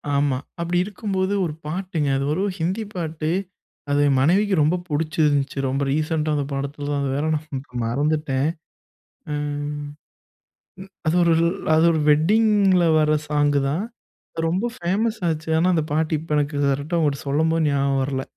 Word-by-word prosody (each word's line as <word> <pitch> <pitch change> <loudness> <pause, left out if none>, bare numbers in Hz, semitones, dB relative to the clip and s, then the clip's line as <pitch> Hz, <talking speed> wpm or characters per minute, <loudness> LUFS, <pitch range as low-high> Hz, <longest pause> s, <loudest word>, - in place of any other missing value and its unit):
ஆமா. 140 -2 +1 0.2
அப்படி 170 +1 -1
இருக்கும்போது 195 -2 -2
ஒரு 155 - -3
பாட்டுங்க. 165 -2 -2
அது 135 - -1
வெறும் 185 +5 -1
ஹிந்தி 185 +7 -1
பாட்டு. 160 -3 -3 0.6
அது 145 - +3 0.2
மனைவிக்கு 190 +8 +3
ரொம்ப 155 +4 +3
பிடிச்சிருந்துச்சு 150 -2 0
ரொம்ப 135 +2 -1
ரீசென்ட்டா 155 +1 0
வந்த 145 -2 0
படத்தில 140 +1 -4
தான் 145 - 0
அது 135 - -1
வேற 145 +2 -1
நான் 150 -3 -5 0.2
மறந்துட்டேன். 145 +2 0 0.8
ம் 145 0 -3 1.2
அது 155 - +2
ஒரு 170 -1 +4 0.4
அது 160 +1 +4
ஒரு 160 - 0
வெட்டிங்கில 195 +2 +4
வர 155 0 +3
சாங் 145 -1 +2
தான். 165 +9 -1 0.6
ரொம்ப 185 +8 0
ஃபேமஸ் 215 +6 -1
ஆச்சு. 160 0 -3
ஆனா 175 +3 +3
அந்த 160 -2 +1
பாட்டு 155 0 +1
இப்போ 160 -1 -7
எனக்கு 145 0 -1
கரெக்ட்டா, 145 +5 -1
ஒரு 140 - -2
சொல்லும்போது 160 +3 +1
ஞாபகம் 140 -1 +1
வரல. 135 -1 -2
155 Hz, 145 wpm, -22 LUFS, 145-170 Hz, 1.2 s, ஒரு